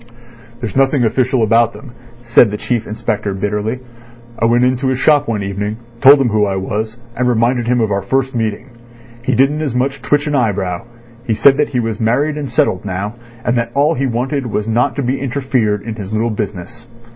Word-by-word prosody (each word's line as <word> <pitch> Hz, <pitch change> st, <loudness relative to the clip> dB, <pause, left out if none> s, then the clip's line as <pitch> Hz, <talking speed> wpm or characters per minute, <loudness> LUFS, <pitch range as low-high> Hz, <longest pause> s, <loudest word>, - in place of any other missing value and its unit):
"There's 115 Hz, -5 st, -5 dB
nothing 135 Hz, -1 st, +3 dB
official 125 Hz, +1 st, +1 dB
about 115 Hz, +1 st, +3 dB
them," 135 Hz, -4 st, -11 dB, 0.3 s
said 120 Hz, -1 st, +5 dB
the 105 Hz, -, -4 dB
Chief 115 Hz, 0 st, -2 dB
Inspector 110 Hz, -2 st, -2 dB
bitterly. 105 Hz, +5 st, -2 dB, 0.6 s
"I -, -, +2 dB
went 120 Hz, +2 st, +3 dB
into 130 Hz, +1 st, 0 dB
his 130 Hz, -1 st, +1 dB
shop 145 Hz, +1 st, +3 dB
one 110 Hz, -3 st, -1 dB
evening, 105 Hz, +2 st, -3 dB, 0.2 s
told 140 Hz, +2 st, +8 dB
him 130 Hz, -3 st, +2 dB
who 105 Hz, -1 st, +2 dB
I 95 Hz, -, -1 dB
was, 110 Hz, +4 st, -3 dB, 0.2 s
and 125 Hz, 0 st, +1 dB
reminded 120 Hz, +1 st, +1 dB
him 125 Hz, 0 st, +2 dB
of 110 Hz, -2 st, 0 dB
our 100 Hz, 0 st, 0 dB
first 135 Hz, +6 st, -1 dB
meeting. 115 Hz, +2 st, -3 dB, 0.5 s
He 130 Hz, 0 st, 0 dB
didn't 140 Hz, +4 st, +2 dB
as 140 Hz, -6 st, -2 dB
much 135 Hz, +2 st, 0 dB
as -, -, -21 dB
twitch 145 Hz, 0 st, +1 dB
an 150 Hz, -, -2 dB
eyebrow. 100 Hz, -6 st, -1 dB, 0.4 s
He 110 Hz, -, +1 dB
said 135 Hz, +5 st, +5 dB
that 150 Hz, -, +1 dB
he 125 Hz, -, -1 dB
was 115 Hz, -2 st, -2 dB
married 135 Hz, +7 st, +1 dB
and 145 Hz, -3 st, -4 dB
settled 95 Hz, -5 st, +1 dB
now, 100 Hz, +1 st, -3 dB, 0.3 s
and 120 Hz, -, +1 dB
that 115 Hz, 0 st, -3 dB
all 145 Hz, +3 st, +3 dB
he 135 Hz, -1 st, -1 dB
wanted 130 Hz, +2 st, -2 dB
was 105 Hz, -1 st, -2 dB
not 120 Hz, +5 st, +1 dB
to 140 Hz, -, -2 dB
be 130 Hz, +2 st, -1 dB
interfered 125 Hz, -6 st, -1 dB
in 115 Hz, -, -5 dB
his 100 Hz, -3 st, -7 dB
little 110 Hz, +2 st, 0 dB
business. 105 Hz, +2 st, -6 dB
120 Hz, 210 wpm, -16 LUFS, 105-130 Hz, 0.6 s, told